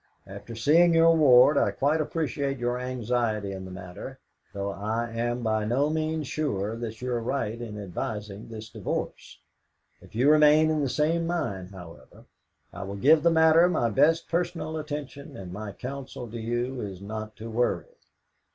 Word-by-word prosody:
After 100 +4 -9
seeing 165 +9 +4
your 165 0 +6
ward, 140 -1 +6
I - - +2
quite 150 +3 +1
appreciate 140 -3 -2
your 120 0 -1
anxiety 120 -4 -1
in 95 -1 -6
the - - -8
matter, 90 -1 -9 0.3
though 100 0 -3
I 110 +4 -3
am 120 +1 -2
by 110 -1 +1
no 135 +7 +1
means 155 -1 -1
sure 115 -8 -2
that 115 0 -6
you 125 - -2
are 120 -1 -1
right 115 -2 -2
in 105 -3 -6
advising 105 +2 -5
this 110 -1 -8
divorce. - - -5 0.6
If - - -17
you 130 +6 +4
remain 155 +1 +6
in 155 -1 0
the 140 - 0
same 165 +4 +1
mind, 100 - -3
however, 90 -4 -13 0.5
I - - -7
will 100 0 -5
give 150 +10 +5
the 170 - +4
matter 160 +1 +5
my 120 -10 +1
best 160 +10 +3
personal 170 -2 -2
attention, 145 -1 -6
and 90 -2 -8
my 105 +1 -6
counsel 130 +1 -7
to 120 - -6
you 120 +3 -2
is 95 -3 -6
not 110 +2 -6
to 115 +1 -8
worry. 120 +2 0
120 Hz, 170 wpm, -27 LUFS, 105-150 Hz, 0.6 s, your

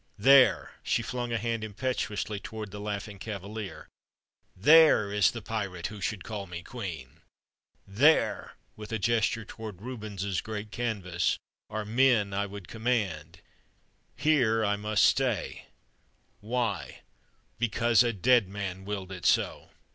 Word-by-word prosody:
There 130 +4 +5
" - - -35
she - - 0
flung 120 -1 -4
a 115 - +1
hand 115 0 -2
impetuously 105 -1 -3
toward 110 0 -7
the 105 - -7
"Laughing 105 -1 -5
Cavalier" 105 0 -7 0.7
"there 145 - +6
is 105 -2 +4
the 115 -3 -7
pirate 100 -6 -4
who 105 - -9
should 105 -1 -3
call 105 -3 -6
me 85 0 -7
queen! 85 - -7 0.6
There" 135 +12 +3 0.2
with 105 +1 -9
a 110 - 0
gesture 115 0 +1
toward 110 -4 -8
Rubens's 105 -6 -4
great 105 -1 -6
canvas 100 -7 -1 0.3
"are 110 0 -4
men 115 -2 +3
that 100 - -2
I 100 - 0
would 100 -2 -9
command. 95 -8 -2 0.7
Here, 120 -8 +2
I 105 0 +2
must 105 0 +2
stay, 125 -9 0 0.7
why? 120 +2 -3 0.6
Because 115 -1 +3
a 120 - +2
dead 115 0 +3
man 95 -2 -5
willed 95 -2 -5
it 90 -2 -2
so. - - +1
105 Hz, 140 wpm, -28 LUFS, 100-115 Hz, 0.7 s, there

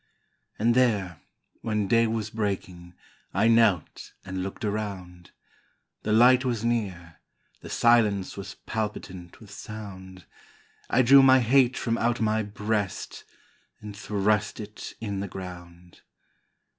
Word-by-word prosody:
And 115 +2 +2
there, 105 -9 +1 0.4
when 105 -3 -1
day 115 +2 +3
was 110 -1 -3
breaking, 95 -5 -4 0.4
I 105 +4 +3
knelt 115 -7 +2
and 95 -1 -4
looked 95 +3 -5
around: 95 -4 -5 0.7
The 105 - -3
light 125 +3 +6
was 120 -3 -2
near, 95 -9 -3 0.4
the - - -10
silence 110 -5 +2
Was 100 - -8
palpitant 105 -5 -5
with 105 -3 -15
sound; 95 -4 -10 0.6
I 130 - +3
drew 135 +3 +8
my 130 0 +6
hate 125 +1 +3
from 115 -1 -1
out 120 0 0
my 110 0 +1
breast 105 -1 -3 0.5
And 105 -1 -9
thrust 105 +1 -1
it 105 0 -8
in 100 -3 -4
the 100 - -3
ground. 90 -2 -10
105 Hz, 125 wpm, -26 LUFS, 95-115 Hz, 0.7 s, drew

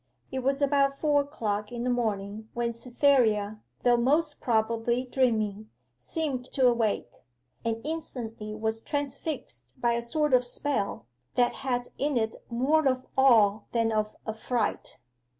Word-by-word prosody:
It 265 - -2
was 275 +2 +1
about 275 -1 +3
four 295 -1 +3
o'clock 215 -7 -3
in 240 -1 -4
the 250 - 0
morning 215 -2 -2
when 235 0 0
Cytherea, 230 -4 +2 0.2
though 245 -1 +5
most 295 +5 +1
probably 230 +2 +1
dreaming, 215 -5 0 0.3
seemed 285 -7 -3
to 265 - +3
awake 230 - +2 0.5
and 225 -1 -1
instantly 230 -9 -5
was 220 +1 -2
transfixed 275 - -4
by 235 -1 +2
a 235 - 0
sort 295 +4 0
of 250 -1 +6
spell, 245 - -2 0.3
that 245 -1 +3
had 245 -2 -1
in 285 -1 +1
it 220 -1 0
more 275 +6 +2
of 255 -1 0
awe 225 -6 +5
than 230 -1 +2
of 215 -1 -1
affright. 220 +1 -2
240 Hz, 140 wpm, -28 LUFS, 220-270 Hz, 0.5 s, of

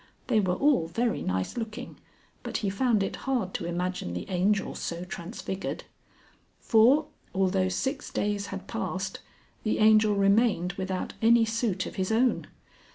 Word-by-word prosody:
They 230 -4 +3
were 185 -3 +1
all 275 - +3
very 230 +8 -1
nice 95 - -2
looking, 225 +2 -5 0.5
but - - -3
he 195 - +1
found 215 0 +2
it - - -3
hard 240 -9 0
to 170 - -3
imagine 175 - -3
the 90 - -5
Angel 195 +2 +1
so 170 +1 -4
transfigured. 190 +1 -5 0.8
For, 250 +7 +5 0.3
although 190 0 +2
six 265 +10 -2
days 205 -1 -1
had 195 -1 -6
passed, 195 -4 -3 0.4
the 215 - 0
Angel 215 -1 +5
remained 200 -3 +3
without 185 0 -3
any 230 0 +5
suit 220 -4 -1
of - - -8
his 190 +2 -1
own. 240 +3 +2
200 Hz, 150 wpm, -28 LUFS, 185-230 Hz, 0.8 s, For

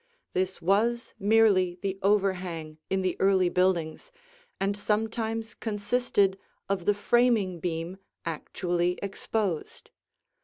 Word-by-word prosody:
This 185 -1 -1
was 230 +7 +1
merely 200 -4 +4
the 195 -1 -2
overhang 185 -6 0
in 190 0 0
the 185 - 0
early 190 -2 +4
buildings 180 - 0 0.5
and 195 +1 0
sometimes 220 +2 -1
consisted 205 -2 0 0.3
of 195 -3 -1
the 205 - +3
framing 215 -4 +2
beam 170 +2 -3 0.3
actually 175 +2 -1
exposed. 200 -3 -3
195 Hz, 105 wpm, -28 LUFS, 180-210 Hz, 0.5 s, merely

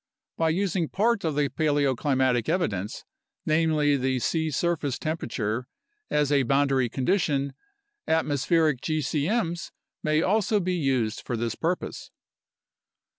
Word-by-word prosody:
By 165 -1 +1
using 175 -1 0
part 215 +1 +1
of 160 -3 -1
the 145 -1 +2
paleoclimatic 135 -4 +1
evidence 105 - -1 0.4
(namely, 155 -2 +2
the 130 0 0
sea 160 +5 0
surface 150 -3 -1
temperature) 125 -7 -3 0.4
as 150 -1 +1
a 140 -1 +4
boundary 135 -1 +2
condition, 140 - 0 0.5
atmospheric 155 -2 +2
gcm's 165 - -1 0.3
may 155 +1 +2
also 210 +1 +2
be 185 -1 -1
used 130 -9 0
for 120 - -3
this 115 0 -1
purpose. 170 +7 -3
150 Hz, 115 wpm, -26 LUFS, 130-165 Hz, 0.5 s, a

